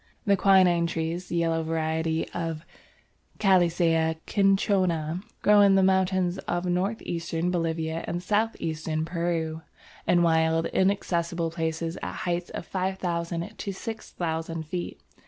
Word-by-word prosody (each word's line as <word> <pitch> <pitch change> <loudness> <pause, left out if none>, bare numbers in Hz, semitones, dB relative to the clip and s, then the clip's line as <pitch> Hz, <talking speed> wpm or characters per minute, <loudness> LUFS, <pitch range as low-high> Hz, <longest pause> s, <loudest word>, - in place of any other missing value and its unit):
The 200 -1 +4
quinine 180 -3 +4
trees, 165 +2 -3
the - - -4
yellow 165 -1 +1
variety 160 0 -1
or 165 -2 -2 0.8
Calisaya 170 -4 +3
cinchona, 185 -5 +1 0.2
grow 210 0 +6
in 200 -1 +6
the 190 - +4
mountains 185 -1 +2
of 175 +1 -2
north 185 +5 -1
eastern 170 0 -2
Bolivia 165 -1 -1
and 175 +1 -3
south 215 +4 +1
eastern 155 0 -2
Peru, 165 -2 -2 0.5
in 175 -1 +4
wild, 160 0 +3
inaccessible 170 -4 0
places 165 +1 -3
at - - -4
heights 175 -1 -2
of - - -6
5000 180 0 -2
to 200 - -3
6000 165 -6 -4
feet. 175 +3 -5
170 Hz, 125 wpm, -26 LUFS, 165-185 Hz, 0.8 s, grow